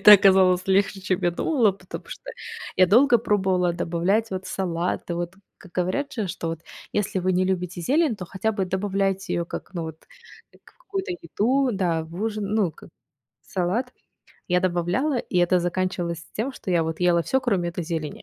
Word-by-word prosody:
это 210 - +10
оказалось 185 -2 +6
легче, 195 +1 +2
чем 185 -1 0
я 175 - +3
думала, 225 - +2
потому 185 -1 -9
что - - -8 0.5
я 185 - +6
долго 240 +6 +6
пробовала 190 -5 +1
добавлять, 180 +6 0
вот, 190 -1 -4
салаты. 175 -1 -2
Вот, 175 +1 -3 0.2
как 185 - -16
говорят 185 +12 -1
же, 220 -4 -2
что 170 -2 -4
вот, 165 -1 -4 0.3
если 205 -2 0
вы 185 0 +1
не 185 +1 +2
любите 180 -1 -2
зелень, 280 - +2
то 185 - -6
хотя 190 +5 -1
бы 200 -3 -1
добавляйте 195 0 -1
её 170 - 0
как, 175 - -8
ну, 170 - -2
вот, 160 0 -9 0.5
как - - -22
в - - -38
какую-то 390 -5 -4
еду, 265 - +1
да, 175 -5 0
в 160 +1 -12
ужин, 215 -2 -1
ну, 205 -6 +2
к - - -19 0.6
в - - -23
салат. 200 +8 -1 0.6
Я 180 0 +4
добавляла, 185 - +1
и 190 - -4
это 175 +1 +4
заканчивалось 175 -1 -2
тем, 245 +6 -2
что 195 - -6
я 175 - +3 0.2
ела 175 -1 +4
всё, 265 +9 +1
кроме 195 -9 0
этой 170 0 -4
зелени. 160 -3 -4
185 Hz, 190 wpm, -24 LUFS, 175-210 Hz, 0.6 s, это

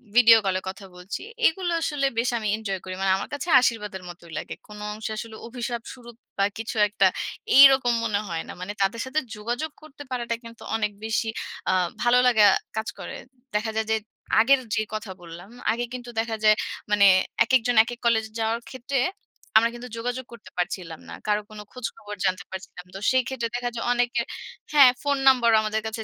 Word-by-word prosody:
Video 230 -2 +8
কলে 185 -1 +1
কথা 195 +1 -8
বলছি। 180 +3 -6 0.3
এগুলো 350 +1 -1
আসলে 290 -3 0
বেশ 235 +2 +2
আমি 215 - -3
এনজয় 195 -4 -3
করি। 185 - -6
মানে 195 - +2
আমার - - -5
কাছে 290 +4 -4
আশীর্বাদের 210 -6 -1
মতোই 170 -1 -12
লাগে। - - -5
কোন 210 0 -11
অংশে 220 +1 -5
আসলে 225 0 -6
অভিশাপস্বরূপ 240 0 -6 0.2
বা 200 - +3
কিছু 225 +1 -5
একটা, 210 - +3 0.5
এইরকম 270 -3 +8
মনে 210 -3 0
হয় 165 -2 -3
না। - - -7
মানে 200 +3 -4
তাদের 225 +4 +1
সাথে 265 +4 0 0.2
যোগাযোগ 240 +8 -3
করতে 295 -1 -12
পারাটা 235 -2 -2
কিন্তু 230 0 -12
অনেক 215 -2 0
বেশি 225 0 0 0.4
আ - - +2 0.3
ভালো 240 +1 +5
লাগা 220 -4 +5 0.3
কাজ 220 - -2
করে। - - -6 0.4
দেখা 220 +1 0
যায় 220 0 0
যে, 220 - +4 0.4
আগের 265 +4 +5 0.2
যে - - +1
কথা 215 -2 -4
বললাম, 175 +3 -11 0.2
আগে 240 +1 -1
কিন্তু 245 -1 -7
দেখা 225 0 -1
যায় 215 0 +7 0.4
মানে 205 -1 +5 0.4
একেকজন 245 -1 +2
একেক 240 +1 -7
কলেজ 225 -2 +3
যাওয়ার 225 +1 0
ক্ষেত্রে, 260 +1 -2 0.6
আমরা 230 +1 +1
কিন্তু 245 +1 -8
যোগাযোগ 245 +2 -3
করতে 235 - -13
পারছিলাম 175 -2 -3
না। - - -7
কারো 210 0 +2
কোন 215 -1 -10
খোঁজখবর 215 -4 -6
জানতে 185 +1 0
পারছিলাম। 190 -1 -8
তো - - -5
সেই 260 -1 +3
ক্ষেত্রে 235 -3 -3
দেখা 245 0 -1
যায়, 230 - -3
অনেকে 245 0 +1 0.5
হ্যাঁ, 275 -4 +8
ফোন 285 -1 +1
নাম্বারও 235 -4 +6
আমাদের 215 0 -1
কাছে 220 0 -4
230 Hz, 185 wpm, -25 LUFS, 210-245 Hz, 0.6 s, Video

